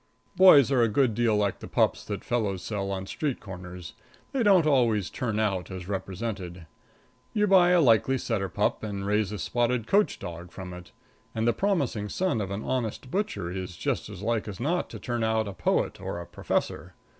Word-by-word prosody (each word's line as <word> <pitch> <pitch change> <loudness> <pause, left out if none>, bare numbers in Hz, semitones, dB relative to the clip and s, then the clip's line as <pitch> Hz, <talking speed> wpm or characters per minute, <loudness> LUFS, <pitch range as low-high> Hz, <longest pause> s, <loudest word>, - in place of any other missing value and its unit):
Boys 150 -8 +7
are 130 -3 +4
a 115 - +4
good 115 +2 +2
deal 115 -1 +2
like 100 -2 0
the - - -8
pups - - +1
that - - -5
fellows 105 -7 -1
sell 100 -3 -3
on 95 -1 -3
street 140 +6 -3
corners 90 -3 -9 0.4
they 270 - -1
don't 195 -7 +5
always 120 - +2
turn 110 -4 -2
out 95 -5 -1
as 90 -2 -7
represented. 95 -3 -5 0.7
You 210 -1 +2
buy 185 -3 +6
a 180 0 +5
likely 130 0 +4
setter 105 -6 -2
pup 105 +4 0
and 100 -2 -4
raise 105 0 +1
a 105 - -4
spotted 120 +1 0
coach 205 - +2
dog 90 -1 -8
from 95 -2 -8
it, 90 0 -11 0.4
and 110 +1 0
the 120 - +4
promising 140 - 0
son 185 - 0
of 100 - -3
an 100 +2 -4
honest 125 0 -3
butcher 200 - -2
is 90 -2 -6
just - - -2
as 100 -2 -9
like 115 -1 0
as 100 -3 -7
not 170 +8 -1
to - - -7
turn 120 -2 -2
out 110 -1 +1
a 100 - -5
poet 95 - 0
or 85 - -4
a 85 - -7
professor. - - -3
110 Hz, 200 wpm, -27 LUFS, 95-130 Hz, 0.7 s, Boys